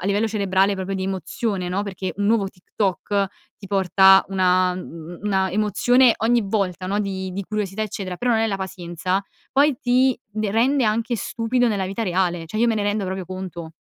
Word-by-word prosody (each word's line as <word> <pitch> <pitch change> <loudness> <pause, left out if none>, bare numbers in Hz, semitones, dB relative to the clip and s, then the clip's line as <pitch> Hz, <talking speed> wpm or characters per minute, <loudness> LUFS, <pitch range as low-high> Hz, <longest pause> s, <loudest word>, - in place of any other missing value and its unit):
livello 205 +3 +1
cerebrale, 200 -1 +1
proprio 190 0 -3
di 190 - -3
emozione, 190 +1 -3
no, 190 +3 -1
perché 190 -3 -4
un 205 0 0
nuovo 215 -3 +2
TikTok 195 +1 -2 0.3
ti 200 - -11
porta 190 0 +5
una, 185 -1 +2
mhmm, 170 -1 -9
una 190 -2 +1
emozione 220 +5 +4
ogni 235 +1 +2
volta, 195 -3 -1
no, 200 +2 -1
di 190 -2 -3
di 200 +2 -3
curiosità, 210 0 -3
eccetera, 190 -3 -4
però 245 0 +1
non 225 - +2
è 225 - +2
la 195 -3 -1
pazienza- 185 0 -3 0.3
poi 285 +1 +4
ti 255 +1 +3
de 215 0 -3
rende 250 +5 +2
anche 225 +2 0
stupido 235 +4 0
nella 195 -3 -1
vita 195 +4 -3
reale. 175 -3 0
Cioè 215 +6 -5
io 235 - +3
me 230 - +2
ne 210 - -1
rendo 205 -1 0
proprio 190 0 -4
conto. 175 -3 -7
195 Hz, 190 wpm, -22 LUFS, 185-220 Hz, 0.3 s, porta